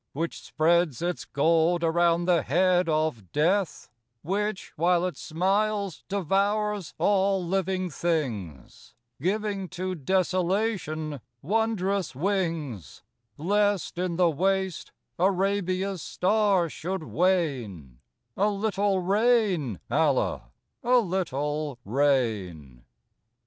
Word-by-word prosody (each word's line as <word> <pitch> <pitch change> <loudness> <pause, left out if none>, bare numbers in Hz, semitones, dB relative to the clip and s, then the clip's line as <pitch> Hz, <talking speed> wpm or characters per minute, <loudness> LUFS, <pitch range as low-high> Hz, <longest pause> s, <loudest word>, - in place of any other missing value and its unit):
Which 165 +4 -3
spreads 165 -2 +1
its 175 -7 -2
gold 165 +4 +2
around 170 +1 +2
the 175 -3 +3
head 180 +5 +2
of 155 - -1
Death,— 180 +4 0 0.4
Which, 200 +3 -2
while 175 +2 +2
it 180 -4 -3
smiles, 195 +4 -1
devours 200 +1 0
all 195 -2 +2
living 185 0 -1
things, 115 - -4 0.3
Giving 200 +1 -1
to 185 0 -3
Desolation 180 - -1 0.2
wondrous 200 - 0
wings: 165 - -2 0.3
Lest 205 +2 0
in 180 -2 -1
the 175 -1 +3
waste 190 +2 -1 0.3
Arabia's 190 0 0
star 195 -1 +2
should 180 +3 -4
wane, 130 - -1 0.4
A 205 +2 +2
little 200 -2 0
rain, 195 - +2
Allah, - - +1 0.3
a 250 +1 +4
little 150 - -1
rain. 100 - -1
180 Hz, 95 wpm, -26 LUFS, 155-195 Hz, 0.4 s, a